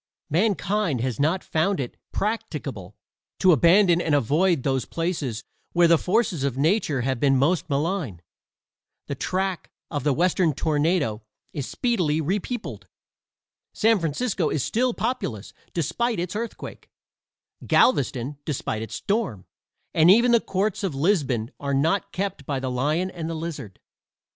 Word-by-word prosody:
Mankind 200 - +1
has 125 -3 -2
not 160 +6 +1
found 160 +3 0
it 125 -3 -4 0.2
practicable 150 - -4 0.4
to 185 - +5
abandon 175 - +5
and 155 -4 +1
avoid 150 - +2
those 135 -2 0
places 160 -9 -3 0.3
where 175 0 +5
the 170 - +6
forces 190 - 0
of 135 -2 -1
nature 155 - +1
have 130 0 -1
been 135 0 +3
most 160 +6 +1
malign. 145 - -1 0.9
The - - -4
track, 185 +6 -2 0.2
of 145 -5 -2
the 150 - +2
Western 170 +1 +2
tornado 150 -7 0 0.3
is 140 -3 -4
speedily 180 - 0
repeopled. 205 - -3 0.9
San 220 -1 +3
Francisco 170 - -1
is 145 - -1
still 245 +1 0
populous, 110 - -3 0.2
despite 225 - -1
its 180 +3 -3
earthquake, 230 +2 -6 0.8
Galveston 140 - +2
despite 125 -7 -3
its 110 - -6
storm, 200 - -2 0.5
and 160 +2 +5
even 235 +5 +6
the 235 - +6
courts 195 +2 -1
of 180 -8 -1
Lisbon 135 - +1
are 140 -1 -1
not 165 +8 +1
kept 190 -7 -4
by 140 -2 -1
the 130 -1 -3
lion 155 +9 0
and 165 -3 -5
the 165 - -3
lizard. 155 - -6
165 Hz, 140 wpm, -24 LUFS, 140-195 Hz, 0.9 s, the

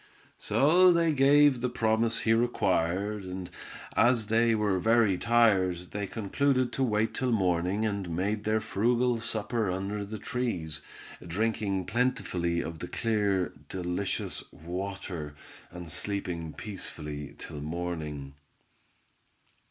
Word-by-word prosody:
So 180 +6 +5
they 170 -2 +3
gave 140 -1 +5
the 125 - 0
promise 115 -1 +1
he 115 - +3
required, 100 -3 +1
and 90 -1 -6 0.4
as 120 -2 +4
they 115 +1 +3
were 105 -3 +1
very 115 -1 +4
tired 100 -5 +3
they 100 0 -3
concluded 130 +5 0
to 135 - 0
wait 110 -2 +1
till 130 -2 -1
morning 95 0 +1
and 100 -4 -2
made 100 +5 -1
their 110 +1 +1
frugal 120 +4 +1
supper 115 -1 -1
under 100 +3 -2
the 105 +2 -6
trees, 100 - -3 0.4
drinking 100 +1 -1
plentifully 90 -9 0
of 80 -1 -6
the 90 - -5
clear, 100 -7 0 0.2
delicious 90 +1 -2
water; 90 -3 -5 0.3
and 90 0 -9
slept 85 -2 -4
peacefully 75 -8 -6
till 75 - -7
morning. 75 -3 -4
100 Hz, 120 wpm, -29 LUFS, 90-115 Hz, 0.4 s, So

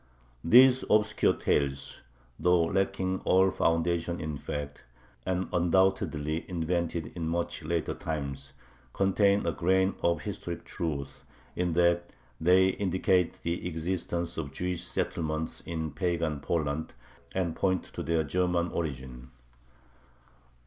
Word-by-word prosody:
These 125 +8 +7
obscure 105 0 +3
tales, 70 -1 -1 0.4
though 90 -1 +4
lacking 95 +1 0
all 95 +1 +4
foundation 85 0 0
in 75 -1 -3
fact, 75 +1 -6 0.4
and 95 0 0
undoubtedly 85 -3 +1
invented 85 -1 -2
in 85 -2 -3
much 85 +1 -2
later 85 +1 -1
times, 70 -3 -5 0.4
contain 100 0 +3
a 85 - +1
grain 95 +3 +2
of 85 -3 +1
historic 95 -4 -5
truth, 70 -5 -4 0.3
in 90 -1 0
that 85 0 +2 0.3
they 90 +3 +5
indicate 95 -1 +1
the 85 +1 -2
existence 85 0 -3
of 75 -4 -4
Jewish 90 +4 -3
settlements 80 -2 -2
in 80 -2 -3
pagan 85 -2 -1
Poland, 80 0 -2 0.4
and 85 -3 0
point 95 -2 +1
to - - -4
their 80 -1 +1
German 90 +3 0
origin. 65 -6 -5
85 Hz, 115 wpm, -29 LUFS, 80-95 Hz, 0.4 s, These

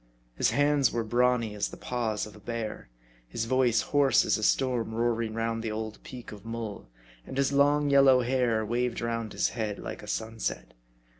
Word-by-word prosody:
His - - +2
hands 145 -2 +3
were 115 - -1
brawny 120 -1 +1
as 105 -1 -2
the - - -10
paws 115 -4 -2
of 105 - -12
a - - -13
bear; 110 - -5 0.4
his 115 - -3
voice 125 -2 +3
hoarse 145 -2 +3
as - - +2
a 110 - -3
storm 120 -1 +1
roaring 115 -1 0
round 115 0 -1
the 115 - -3
old 110 0 -5
peak 125 -2 -10
of 105 -2 -11
Mull; 115 - -6 0.3
and 130 - -8
his 140 0 +1
long 145 +1 +3
yellow 135 -2 +6
hair 120 -3 +1
waved 120 +2 -1
round 115 -2 -3
his - - 0
head 110 -3 -3
like - - -7
a - - -11
sunset. 110 - -4
115 Hz, 190 wpm, -28 LUFS, 110-125 Hz, 0.4 s, yellow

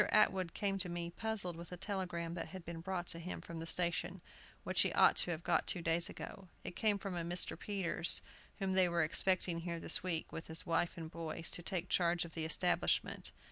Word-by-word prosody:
Atwood 190 -5 +3
came 195 -2 -1
to 180 -1 -1
me, 170 0 -4
puzzled 200 -3 -1
with 170 +1 -10
a 180 - -6
telegram 180 -3 -3
that 170 -1 -4
had 185 -3 -9
been 165 -1 -6
brought 180 0 -3
to 165 - 0
him 175 +2 -5
from 165 -1 -8
the 165 - -5
station, 175 +1 0 0.4
which - - +2
he - - +2
ought - - +6
to - - +3
have 170 -1 -3
got - - +1
two 175 - 0
days 165 +1 +2
ago. 195 -3 -8 0.2
It 180 - -5
came 215 -2 +2
from 195 -2 -5
a 170 - -1
Mr. 175 +2 +2
Peters, 190 -4 +1 0.4
whom 195 -2 -1
they 185 -1 +4
were 170 -1 +2
expecting 175 +1 +5
here 170 0 -4
this - - +1
week, 170 -3 -2
with 165 - -6
his 160 0 -1
wife 170 +1 0
and 160 -1 -7
boys, 165 0 -4
to - - -3
take 180 +1 -3
charge 175 -1 +2
of 165 - -11
the 160 -1 -2
establishment. 175 +3 +1
175 Hz, 220 wpm, -36 LUFS, 165-185 Hz, 0.4 s, ought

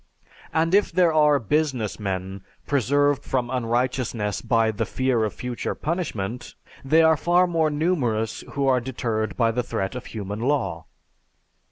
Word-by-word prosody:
And 165 +2 +1
if 205 +1 +4
there 170 -1 +3
are 150 -2 +5
business 130 -3 -1
men 95 -1 -4 0.2
preserved 145 +1 +2
from 125 -2 -2
unrighteousness 120 -4 -1
by 115 -2 +2
the 105 - -2
fear 130 -3 0
of 105 -3 -2
future 125 -1 -4
punishment, 125 - -4 0.3
they 160 +4 +4
are 160 0 +5
far 175 +4 +3
more 165 -3 +1
numerous 140 -9 -1
who 140 -1 0
are 130 -2 +3
deterred 115 -4 -3
by 115 -2 +3
the 125 +2 -1
threat 110 -5 -3
of 125 -1 -7
human 105 -1 -5
law. 115 - -1
125 Hz, 150 wpm, -24 LUFS, 110-150 Hz, 0.3 s, are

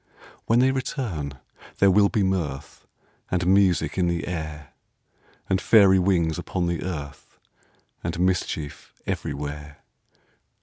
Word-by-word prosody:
When 115 - +3
they 130 +2 +4
return, 115 - -3 0.4
there 100 -1 +5
will 100 +1 +5
be 105 - +1
mirth 85 -8 -3 0.4
And 90 -1 0
music 95 -1 +3
in 90 - +2
the 85 0 -2
air, 75 -4 -6 0.7
And 95 0 +1
fairy 100 -4 +6
wings 90 -3 +1
upon 90 0 -2
the 85 -1 -2
earth, 75 -6 -7 0.7
And 85 +1 -3
mischief 90 -5 -2
everywhere. 75 0 -5
90 Hz, 120 wpm, -24 LUFS, 75-95 Hz, 0.7 s, fairy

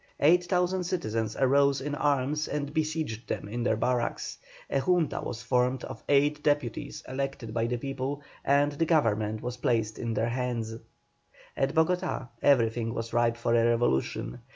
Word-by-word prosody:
Eight 175 +4 +5
thousand 180 0 +1
citizens 115 - -2
arose 140 +1 +4
in 145 +2 -4
arms 145 +1 +1
and 145 0 -3
besieged 155 -7 -2
them - - -3
in 120 +4 -4
their 115 -2 +2
barracks. 120 +1 -1 0.3
A 135 - 0
Junta 170 +2 +1
was 120 0 -5
formed 125 +1 +1
of - - -8
eight 145 +1 +3
deputies 145 -6 -1
elected 135 -4 -4
by 115 0 0
the 120 +1 -1
people, 135 +2 -4 0.2
and 145 +1 +3
the 145 +3 0
government 110 -9 +1
was 125 0 -4
placed 110 -3 0
in 115 -1 -2
their 115 - +1
hands. 120 -2 -2 0.8
At 135 +3 0
Bogotá 175 -4 +1
everything 115 -4 +2
was 115 0 -4
ripe 120 -1 +2
for 115 0 0
a 115 -1 +4
revolution. 115 - 0
130 Hz, 160 wpm, -28 LUFS, 115-145 Hz, 0.8 s, Eight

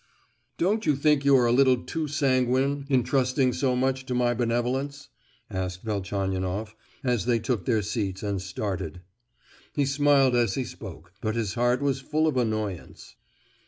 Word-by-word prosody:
"Don't 210 +5 +1
you 150 - +4
think 145 0 +2
you 140 -1 +6
are 125 - +3
a 120 - +3
little 130 0 +5
too 160 -1 -3
sanguine 135 -1 +1
in 130 -3 +3
trusting 130 0 +1
so 130 0 +1
much 130 +1 0
to 125 - -2
my 120 -1 +2
benevolence?" 125 +5 -2 0.4
asked 95 -2 -4
Velchaninoff, 100 0 -2 0.3
as 125 -4 0
they 120 -1 +3
took 115 -4 -2
their 110 -3 +2
seats 95 -2 -3
and 100 -2 -2
started. 95 -3 -4 0.7
He 145 - +2
smiled 140 -2 +3
as 120 -1 +2
he 135 - -1
spoke, 90 -7 -10
but 110 -2 -1
his 110 -4 -1
heart 120 +3 +1
was 140 -2 +1
full 155 +3 0
of 155 -4 +1
annoyance. 110 -6 -3
125 Hz, 160 wpm, -26 LUFS, 105-135 Hz, 0.7 s, you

